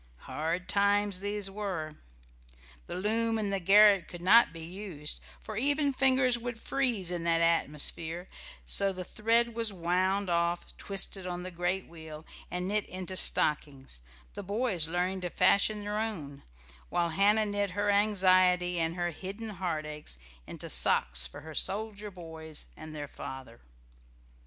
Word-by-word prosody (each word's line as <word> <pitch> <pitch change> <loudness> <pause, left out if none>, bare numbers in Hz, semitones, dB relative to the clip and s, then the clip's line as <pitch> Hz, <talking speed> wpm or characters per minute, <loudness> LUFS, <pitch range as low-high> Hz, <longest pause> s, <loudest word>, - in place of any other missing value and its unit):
Hard 165 +4 -3
times 200 -1 +2
these 205 0 -2
were. 185 -7 -4 0.9
The - - -5
loom 225 +4 0
in 210 -2 -1
the 195 - 0
garret 200 0 +6
could 175 -1 -9
not 230 +6 +6
be 165 0 -9
used, 170 -4 -4 0.2
for 215 - -7
even 285 +3 +2
fingers 260 -2 +3
would 240 -1 -5
freeze 235 -11 -1
in 175 -1 -3
that 165 0 +2
atmosphere; 165 +1 0 0.4
so 195 - +3
the 185 -1 -6
thread 230 +5 +1
was 230 -1 -2
wound 185 +2 0
off, 170 0 -1
twisted 195 -1 0
on 180 0 -4
the 185 - -6
great 175 +2 -2
wheel, 160 -1 -10 0.2
and 180 +1 -3
knit 210 +1 -1
into 185 0 -5
stockings, 140 - +1 0.3
the - - -6
boys 200 -5 0
learning 180 +3 -1
to 180 - -3
fashion 210 +4 +2
their 205 +1 -3
own, 160 -11 -4 0.5
while 170 -1 0
Hannah 205 +6 +3
knit 205 -1 -1
her 205 0 +2
anxiety 185 -3 +3
and 165 0 -1
her 175 -1 -1
hidden 195 +7 -7
heartaches 155 - -4 0.3
into - - -7
socks 60 +1 +3
for 60 - -11
her 160 0 -10
soldier 210 +3 -1
boys 160 -4 -9
and 155 0 -10
their 145 -1 -5
father. 130 -4 -9
185 Hz, 150 wpm, -30 LUFS, 165-210 Hz, 0.9 s, garret